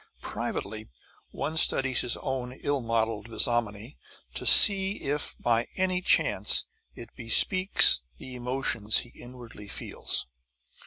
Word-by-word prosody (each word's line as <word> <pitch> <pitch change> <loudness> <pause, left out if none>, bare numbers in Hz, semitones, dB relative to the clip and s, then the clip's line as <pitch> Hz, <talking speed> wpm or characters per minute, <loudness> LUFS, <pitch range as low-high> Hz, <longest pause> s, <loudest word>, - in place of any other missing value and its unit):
Privately, 110 +2 -6 0.4
one 155 +2 -5
studies 135 -5 +2
his 120 - -3
own 130 -2 -5
ill 140 +1 -3
modeled 115 -2 -2
visnomy 115 +1 -3 0.4
to - - -5
see 195 -1 +5
if 145 -5 -3
by 115 -1 0
any 185 -1 -1
chance - - +2 0.3
it - - -11
bespeaks 185 - +4 0.2
the 130 - -11
emotions 120 -4 0
he - - -17
inwardly 120 -4 -13
feels. - - -4
125 Hz, 115 wpm, -26 LUFS, 115-145 Hz, 0.4 s, see